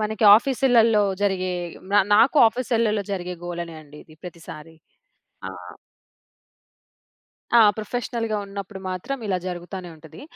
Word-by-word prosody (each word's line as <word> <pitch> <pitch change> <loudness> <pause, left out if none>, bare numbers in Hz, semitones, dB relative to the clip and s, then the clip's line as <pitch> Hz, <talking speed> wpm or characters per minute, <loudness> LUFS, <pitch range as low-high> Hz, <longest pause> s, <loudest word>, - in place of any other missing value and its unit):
మనకి 215 0 -2
ఆఫీసులల్లో 235 -3 +3 0.2
జరిగే 190 -2 0 0.4
న - - +1 0.2
నాకు 235 +8 +4
ఆఫీసలల్లో 225 -4 -1
జరిగే 180 -1 -4
గోలనే 170 -1 -6
అండి 150 0 -16
ఇది 155 - -18
ప్రతిసారి. 165 -2 -11 0.7
ఆ! - - -6 2.1
ఆ! - - +7 0.2
ప్రొఫెషనల్‌గా 230 0 -3
ఉన్నప్పుడు 195 0 -8
మాత్రం 185 +10 -4
ఇలా 185 -2 -1
జరుగుతానే 180 +1 -7
ఉంటది. 160 0 -14
200 Hz, 110 wpm, -23 LUFS, 175-225 Hz, 2.1 s, ఆ